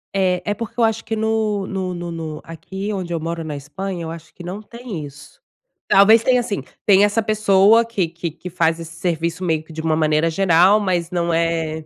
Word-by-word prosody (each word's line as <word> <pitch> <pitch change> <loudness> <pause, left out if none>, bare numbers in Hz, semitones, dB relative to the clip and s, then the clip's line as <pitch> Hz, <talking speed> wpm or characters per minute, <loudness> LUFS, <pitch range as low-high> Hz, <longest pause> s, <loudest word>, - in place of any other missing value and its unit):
É. 185 -2 +1
É 205 - 0
porque 230 +3 -7
eu 235 - +4
acho 225 0 +1
que 225 - -3
no 220 -2 0
no 190 -2 -3
no 175 -1 -5
no 160 -2 -6
aqui 190 +5 -6
onde 185 -3 -4
eu 165 - -1
moro, 165 +1 -4
na 155 -2 -5
Espanha, 170 +6 -5
eu 160 - -5
acho 165 -1 -11
que 175 - -12
não 185 +4 -6
tem 230 -6 -7
isso. 145 +1 -14 0.5
Talvez 215 +4 +6
tenha, 250 -1 +3
assim, 220 -4 -3 0.2
tem 200 -1 +6
essa 205 +2 +2
pessoa 215 +1 +4
que 200 -7 -1
que 170 +1 -5
que 180 +3 -9
faz 165 -1 +1
esse 165 0 -9
serviço 170 +1 -2
meio 160 -3 0
que 160 0 -14
de 160 - -5
uma 160 -1 +1
maneira 155 +1 +2
geral, 185 +3 +4
mas 180 -4 -1
não 170 -1 0
é 165 -1 -1
180 Hz, 220 wpm, -20 LUFS, 165-205 Hz, 0.5 s, Talvez